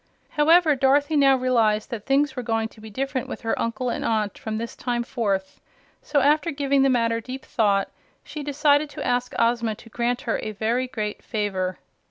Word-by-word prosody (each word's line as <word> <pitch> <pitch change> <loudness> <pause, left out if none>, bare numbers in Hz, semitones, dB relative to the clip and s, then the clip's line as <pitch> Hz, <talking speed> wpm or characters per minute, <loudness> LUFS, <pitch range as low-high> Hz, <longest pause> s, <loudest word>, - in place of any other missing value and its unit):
However, 320 +1 +4
Dorothy 285 +3 +2
now 275 -2 +5
realized 230 -4 +1
that 220 -3 -6
things 275 0 +2
were 250 - -3
going 225 -2 -1
to 220 - -17
be 220 - -9
different 260 +2 -3
with - - -6
her 225 - -1
uncle 230 +2 -2
and - - -3
aunt 215 -3 0
from 220 -1 -5
this 230 +1 -5
time 240 -1 -2
forth, 200 -6 -2 0.4
so 285 - +1
after 300 +4 +3
giving 280 -2 +1
the 270 - +4
matter 230 -2 +1
deep 260 +3 -8
thought 200 -3 +1 0.3
she 300 - -7
decided 290 +1 +2
to - - -6
ask 245 0 -1
Ozma 230 -1 +1
to 230 - -15
grant 240 +2 -1
her - - -1
a 215 - -5
very 230 +5 0
great 210 -4 -4
favor. 190 -4 -2
245 Hz, 195 wpm, -24 LUFS, 220-275 Hz, 0.4 s, now